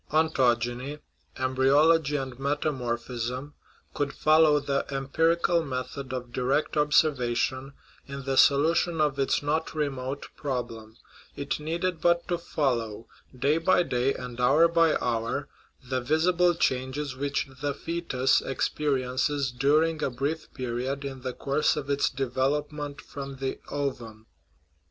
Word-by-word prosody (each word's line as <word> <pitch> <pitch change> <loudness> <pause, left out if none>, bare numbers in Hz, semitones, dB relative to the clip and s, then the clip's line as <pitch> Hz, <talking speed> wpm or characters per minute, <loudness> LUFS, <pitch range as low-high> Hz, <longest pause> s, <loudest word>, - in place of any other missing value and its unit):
Ontogeny 130 -3 +1 0.4
(embryology 140 +4 +3
and 130 -3 -4
metamorphism) 130 -2 -2 0.4
could 145 -1 -1
follow 155 -1 +4
the 140 -1 -1
empirical 165 +5 +1
method 130 -1 -5
of 125 -2 -5
direct 130 +5 0
observation 135 -2 +1 0.3
in 140 0 -7
the 135 0 0
solution 160 +5 +4
of 145 -2 +1
its 135 +1 +1
not 155 +2 -1
remote 140 -2 -3
problem; 120 -5 -5 0.4
it 140 +1 -3
needed 165 +2 -2
but 170 0 +2
to 175 -1 -1
fol 145 -6 0
low, 110 -1 -7 0.3
day 140 +5 +2
by 180 +1 +3
day 125 -3 0
and 125 -1 -6
hour 145 +7 +5
by 165 -1 +3
hour, 115 -1 -1 0.4
the 130 0 -1
visible 175 +6 +2
changes 130 -1 -1
which 140 +1 -2
the 145 -1 -1
foetus 165 -6 0
experiences 135 0 -1
during 155 +5 +2
a - - +1
brief 140 +6 -3
period 130 +3 -3
in 135 -2 -6
the 130 0 -3
course 140 +4 0
of 145 -2 -3
its 140 0 +2
development 140 +3 -2
from 140 -1 -8
the 135 0 -4
ovum. 120 -6 -4
140 Hz, 130 wpm, -27 LUFS, 130-150 Hz, 0.4 s, hour